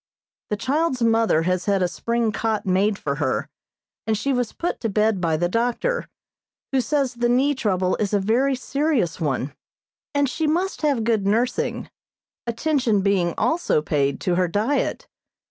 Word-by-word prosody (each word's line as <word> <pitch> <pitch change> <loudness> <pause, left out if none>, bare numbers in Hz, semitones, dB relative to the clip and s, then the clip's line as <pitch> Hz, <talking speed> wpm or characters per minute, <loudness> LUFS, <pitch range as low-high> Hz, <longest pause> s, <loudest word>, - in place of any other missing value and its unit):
The 210 - -1
child's 265 +2 0
mother 225 -8 +3
has 185 +1 0
had 195 -2 +2
a - - +2
spring 235 +4 -1
cot 220 0 -1
made 195 +2 +2
for 140 -5 -3
her, 140 -4 -1 0.6
and 220 -1 +1
she 275 +5 0
was 245 -3 -1
put 345 - -3
to 225 - -2
bed 210 -1 +1
by 165 -2 +1
the 175 +2 +1
doctor, 245 - -1 0.6
who 265 -1 +2
says 270 0 0
the 240 0 0
knee 265 +4 +3
trouble 190 -8 0
is 205 -2 -1
a 205 - +2
very 245 +7 +2
serious 260 - -1
one, 140 -2 -1 0.6
and 285 0 +3
she 310 +4 -1
must 355 +5 0
have 285 -7 +1
good 220 -3 +1
nursing, 235 +5 0 0.6
attention 235 -3 +1
being 185 -4 +1
also 330 - +1
paid 140 -2 0
to 180 - 0
her 180 0 +2
diet. 250 - -1
225 Hz, 165 wpm, -23 LUFS, 185-265 Hz, 0.6 s, mother